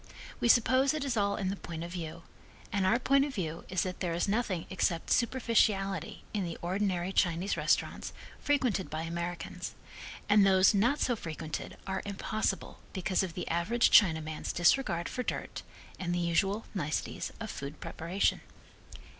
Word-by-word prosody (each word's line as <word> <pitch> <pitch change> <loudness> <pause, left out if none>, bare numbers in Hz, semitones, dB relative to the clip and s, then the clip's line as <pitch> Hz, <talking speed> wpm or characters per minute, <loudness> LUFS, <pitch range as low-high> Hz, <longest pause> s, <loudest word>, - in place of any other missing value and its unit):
We - - +1
suppose 260 +4 +4
it 295 -2 -2
is 265 -3 -1
all 200 -2 +1
in 190 -2 -1
the 195 - -1
point 165 -4 -6
of 170 - -6
view, 170 -2 -6 0.5
and 195 -2 +2
our 225 - +4
point 275 +2 +3
of 285 -1 -3
view 165 -5 -4
is 185 -1 +1
that 185 -1 -4
there 170 -3 -1
is 175 - 0
nothing 200 -5 0
except 175 -3 0
superficiality 225 -5 +1
in 205 -3 0
the 170 -2 -4
ordinary 185 0 -1
Chinese 175 +3 +1
restaurants - - 0 0.3
frequented 255 -10 +1
by 155 +1 -3
Americans, 170 0 -4 0.5
and 205 0 +6
those 190 +1 +6
not 240 +9 +2
so 245 - +1
frequented 160 -5 -6
are 190 0 -2
impossible 205 0 -2
because 185 0 0
of 180 -4 -4
the 180 - -4
average 205 +9 +2
Chinaman's 160 -6 +3
disregard 175 -2 +2
for 250 - -3
dirt - - -4 0.4
and 175 -1 -1
the - - 0
usual 195 +5 +1
niceties 155 -6 -2
of 220 -2 -5
food 140 +2 -7
preparation. 170 +5 -1
190 Hz, 165 wpm, -31 LUFS, 170-215 Hz, 0.5 s, and